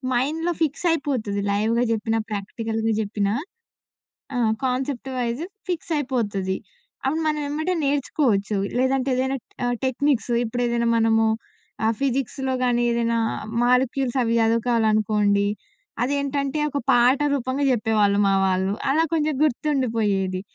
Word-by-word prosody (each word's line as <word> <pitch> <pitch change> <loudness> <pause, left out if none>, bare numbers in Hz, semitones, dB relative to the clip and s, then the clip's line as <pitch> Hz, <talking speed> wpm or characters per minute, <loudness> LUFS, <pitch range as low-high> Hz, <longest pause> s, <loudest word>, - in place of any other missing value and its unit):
మైండ్‌లో 320 +7 0
ఫిక్స్ 310 +4 -2
అయిపోతది 220 -10 -2
లైవ్‌గా 225 +4 +1
జెప్పిన, 225 +1 -1
ప్రాక్టికల్‌గా 220 +2 -2
జెప్పినా. 205 0 -1 1.0
ఆ! - - 0 0.3
కాన్సెప్ట్ 260 +1 -2
వైస్ 240 +3 -2 0.3
ఫిక్స్ 345 -1 -3
అయిపోతది. 205 -8 -1 0.5
అప్పుడు 310 +5 0
మనం 305 -1 +1
వెంబటే 315 +5 -1
నేర్చుకోవచ్చు. 250 -7 +1 0.2
లేదంటే 260 +1 +1
ఏదైనా 265 +1 0 0.3
ఆహ్, 245 0 +1
టెక్నిక్స్ 260 -1 +1
ఇప్పుడేదైనా 235 0 0
మనము 225 0 +3 0.6
ఆ - - +4
ఫిజిక్స్‌లో 265 0 -1
కానీ, 240 -1 +2
ఏదైనా 235 0 +1 0.5
మాలిక్యూల్స్ 255 +1 +2
అవి 230 0 +1
సదువుకోవాలనుకోండి, 215 -3 +2 0.6
అదేంటంటే 280 +2 -1
ఒక 285 - -3
పాట 245 +3 +5
రూపంగా 265 +1 -1
జెప్పేవాళ్ళు 215 -4 +2
మా 195 - +3
వాళ్ళు. 190 +1 +1 0.2
అలా 310 +4 +3
కొంచెం 310 -1 +1
గుర్తుండిపోయేది. 225 -10 0
245 Hz, 115 wpm, -23 LUFS, 220-275 Hz, 1.0 s, పాట